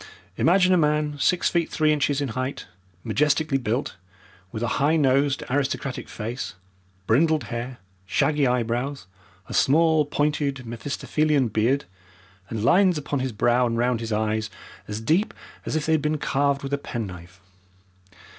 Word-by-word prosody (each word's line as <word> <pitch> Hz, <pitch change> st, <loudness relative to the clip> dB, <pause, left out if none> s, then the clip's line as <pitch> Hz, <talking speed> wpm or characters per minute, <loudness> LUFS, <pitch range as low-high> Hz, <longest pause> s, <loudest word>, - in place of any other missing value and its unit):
Imagine 185 Hz, +2 st, +4 dB
a -, -, +5 dB
man 150 Hz, -1 st, +1 dB
six 180 Hz, +5 st, +2 dB
feet 170 Hz, -2 st, +1 dB
three 155 Hz, -1 st, +2 dB
inches 145 Hz, -1 st, 0 dB
in 140 Hz, -, -2 dB
height, 130 Hz, +4 st, -4 dB, 0.4 s
majestically 150 Hz, -1 st, +1 dB
built, 120 Hz, +3 st, -2 dB, 0.5 s
with 110 Hz, -, -4 dB
a -, -, +1 dB
high 150 Hz, +3 st, +3 dB
nosed, 140 Hz, -1 st, +2 dB
aristocratic 135 Hz, -1 st, -2 dB
face, 115 Hz, +4 st, -5 dB, 0.5 s
brindled 155 Hz, +8 st, +3 dB
hair, 120 Hz, +2 st, -4 dB, 0.3 s
shaggy 145 Hz, +7 st, +2 dB
eyebrows, 125 Hz, 0 st, -1 dB, 0.4 s
a -, -, -7 dB
small, 160 Hz, +2 st, +4 dB
pointed 145 Hz, -3 st, -1 dB
Mephistophelian 140 Hz, +4 st, 0 dB
beard, 115 Hz, +7 st, +1 dB, 0.6 s
and 110 Hz, -2 st, -3 dB
lines 185 Hz, -, +4 dB
upon 145 Hz, -1 st, -2 dB
his 130 Hz, 0 st, -2 dB
brow 120 Hz, +3 st, +2 dB
and 115 Hz, 0 st, -2 dB
round 120 Hz, 0 st, +1 dB
his 115 Hz, -1 st, -5 dB
eyes 110 Hz, 0 st, 0 dB, 0.4 s
as 105 Hz, +1 st, -4 dB
deep 160 Hz, -, +1 dB, 0.3 s
as -, -, -2 dB
if 155 Hz, -1 st, 0 dB
they 160 Hz, -, 0 dB
had 160 Hz, -2 st, +3 dB
been 150 Hz, +1 st, 0 dB
carved 140 Hz, -1 st, 0 dB
with 135 Hz, +1 st, -4 dB
a 140 Hz, -, +1 dB
penknife. 90 Hz, -8 st, -7 dB
140 Hz, 150 wpm, -24 LUFS, 120-150 Hz, 0.6 s, a